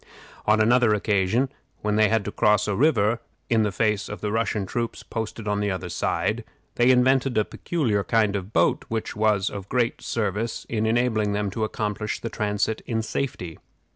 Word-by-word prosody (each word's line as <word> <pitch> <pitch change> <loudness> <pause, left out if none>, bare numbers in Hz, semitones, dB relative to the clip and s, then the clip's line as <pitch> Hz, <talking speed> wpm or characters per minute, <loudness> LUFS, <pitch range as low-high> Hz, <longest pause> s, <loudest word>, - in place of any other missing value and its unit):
On 105 +1 +4
another 115 0 +4
occasion, 105 +5 +1 0.3
when 105 0 +1
they 110 -1 +4
had 110 -2 +1
to 105 - -3
cross 105 0 +3
a 105 - 0
river 115 -4 +3 0.3
in 115 -1 +4
the 105 -1 +1
face 105 +1 0
of 105 - -6
the 105 - -2
Russian 110 -2 0
troops 115 +4 -3
posted 110 -1 -5
on 105 0 0
the 105 0 0
other 95 -2 -3
side, 90 - -1 0.3
they 120 +1 +3
invented 130 0 +3
a 105 - +3
peculiar 120 -12 -1
kind 105 -2 +2
of 100 +1 -4
boat, - - +2
which 110 -1 -3
was 105 -2 +2
of 100 -1 -7
great 120 -2 0
service 110 +1 -2
in 110 -1 -1
enabling 110 -3 +1
them 100 -1 -1
to 110 +3 -2
accomplish 105 0 -2
the 115 - -5
transit 105 +1 -1
in 110 -2 -1
safety. 100 - -4
110 Hz, 185 wpm, -24 LUFS, 105-115 Hz, 0.3 s, On